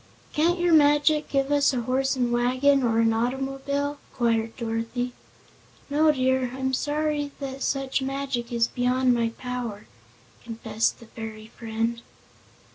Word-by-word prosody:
"Can't 335 +4 +2
your 350 -1 +3
magic 295 0 +4
give 275 0 0
us 285 -1 +3
a 245 - 0
horse 265 +3 0
an' 245 -1 +1
wagon, 255 +3 +3
or 230 -2 +2
an 225 0 +3
automobile?" 270 +4 -2
inquired 230 -2 0
Dorothy. 230 +1 -3 0.8
"No, 305 +2 +4
dear; 260 -2 +1
I'm 265 0 -2
sorry 295 +1 -1
that 270 -1 -6
such 270 0 0
magic 265 -3 -3
is 235 -1 +2
beyond 250 +1 +2
my 235 -1 +1
power," 245 -4 -5 0.6
confessed 225 -1 -2
her - - -11
fairy 220 -1 -9
friend. 230 0 -2
255 Hz, 135 wpm, -25 LUFS, 235-280 Hz, 0.8 s, magic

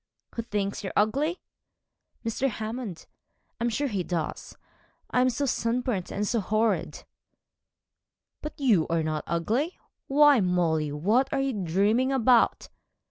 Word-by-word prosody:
'Who 230 - -2
thinks 205 -3 -3
you 190 - -3
ugly?' 280 - +1 0.8
'Mr. 240 +4 0
Hammond. 220 -5 -5 0.5
I'm 235 - +1
sure 280 +5 -1
he 205 -7 -2
does. 170 -3 -4 0.5
I 250 - +3
am 255 - +4
so 270 +4 -1
sunburnt 235 -6 -1
and 210 +1 -2
so 235 - +1
horrid!' 215 +2 0 1.4
'But 300 - -7
you 220 - +3
are 165 -1 0
not 155 -1 -2
ugly. 230 - -1 0.3
Why, 290 -1 +6
Molly, 170 -5 +1
what 215 - +1
are 275 - 0
you 270 -1 0
dreaming 205 +7 +1
about?' 250 -2 +3
220 Hz, 135 wpm, -27 LUFS, 185-255 Hz, 1.4 s, Why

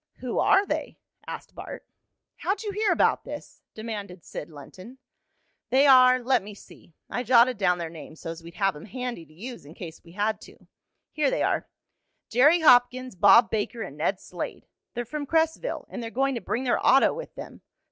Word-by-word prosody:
"Who 250 -2 -3
are 390 +1 +4
they?" - - -4 0.3
asked - - -8
Bart. - - -9 0.5
"How'd 390 +3 -2
you 415 - -3
hear 420 +1 +1
about - - +2
this?" 295 0 -9
demanded 205 -6 -7
Sid 150 - -7
Lenton. 185 - -12 0.7
"They 270 +2 +4
are 255 -2 +6
let 250 -1 +2
me 205 +1 -10
see. 170 -4 -17
I 245 - -3
jotted 245 -1 +4
down 180 -3 +2
their 165 -2 -5
names 160 -1 -11
so's 165 0 -7
we'd 170 0 -12
have 195 -3 +1
'em 150 - -10
handy 240 -7 -6
to - - -22
use 235 +7 -8
in 150 +4 -14
case 165 -3 -9
we 170 - -16
had 210 +2 -1
to. - - -14 0.5
Here 300 -2 +1
they - - 0
are - - 0 0.6
Jerry 295 +9 +5
Hopkins, 250 -3 +4
Bob 200 +6 +6
Baker 220 +2 -2
and - - -8
Ned - - -1
Slade. - - -7 0.3
They're 240 0 -3
from 290 +3 -5
Cresville, 320 - 0
and 250 - -7
they're 230 - -5
going 270 +3 0
to 235 - -4
bring 245 - -2
their 250 - 0
auto 270 +1 +5
with - - -8
them. - - -10
240 Hz, 190 wpm, -26 LUFS, 190-265 Hz, 0.7 s, are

